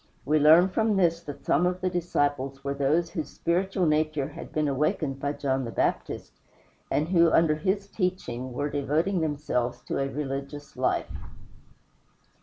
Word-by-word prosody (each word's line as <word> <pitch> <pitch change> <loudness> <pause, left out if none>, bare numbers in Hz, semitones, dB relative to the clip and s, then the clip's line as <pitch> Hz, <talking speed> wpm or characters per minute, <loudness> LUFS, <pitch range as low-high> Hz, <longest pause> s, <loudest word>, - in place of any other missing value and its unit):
We 155 +1 +3
learn 160 +5 +7
from 215 +2 +1
this 170 -3 +2
that 145 -1 -8
some 175 +5 +3
of 180 0 -2
the 185 0 0
disciples 145 -6 -1
were 140 0 -1
those 150 +5 +1
whose 160 -5 -4
spiritual 185 +2 0
nature 155 -2 +1
had 145 - -9
been 155 -1 0
awakened 140 0 0
by 145 +1 -1
John 135 -2 -1
the 120 - -4
Baptist, - - -2 0.6
and 155 +3 0
who, 170 -2 +5
under 165 -2 +4
his 195 +6 -1
teaching, 180 - -3
were 145 +4 -2
devoting 155 +6 0
themselves 145 -6 -1
to - - -3
a 135 0 0
religious 140 0 -5
life. - - -1
150 Hz, 160 wpm, -27 LUFS, 140-175 Hz, 0.6 s, learn